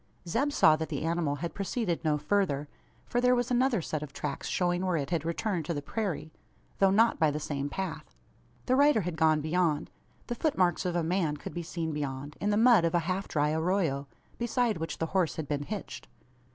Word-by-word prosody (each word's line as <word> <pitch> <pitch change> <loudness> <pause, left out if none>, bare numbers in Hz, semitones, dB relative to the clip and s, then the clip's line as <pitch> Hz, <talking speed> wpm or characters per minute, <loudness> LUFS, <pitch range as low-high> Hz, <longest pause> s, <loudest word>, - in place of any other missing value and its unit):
Zeb 260 - +1
saw 155 - +5
that 160 0 -4
the 145 -2 -3
animal 165 -3 0
had 170 +3 -4
proceeded 195 -3 -2
no 155 -2 +2
further: 150 -5 0 0.4
for 245 - 0
there 250 0 +4
was 245 +1 -1
another 245 -6 +2
set 155 -1 -3
of 150 -2 -7
tracks 140 -2 -4
showing 175 0 0
where 180 -3 +1
it 140 +1 -3
had 165 -3 0
returned 170 +1 -2
to 170 - -2
the 145 - -2
prairie 170 -2 -3 0.5
though 195 - +5
not 225 +4 +3
by 160 -2 +4
the 150 +1 -2
same 145 -2 -3
path. 180 - -5 0.5
The 255 - +3
rider 285 -4 +5
had 180 -2 -3
gone 155 -1 +3
beyond. 155 -1 0 0.3
The 240 - -3
foot 295 +5 -1
marks 180 -2 +2
of 175 - -2
a 170 - +1
man 165 -3 0
could - - -8
be 175 - -3
seen 165 -1 -3
beyond 145 0 -4
in 205 - +1
the 205 - +2
mud 230 -5 +6
of 165 0 +1
a - - +5
half 185 +3 -2
dry 150 0 +1
arroyo 160 -4 0 0.3
beside 235 -4 0
which 165 - -4
the 165 - -1
horse 175 -8 +2
had 155 -3 -4
been 145 -1 -1
"hitched." 205 +7 -6
170 Hz, 220 wpm, -29 LUFS, 150-200 Hz, 0.5 s, mud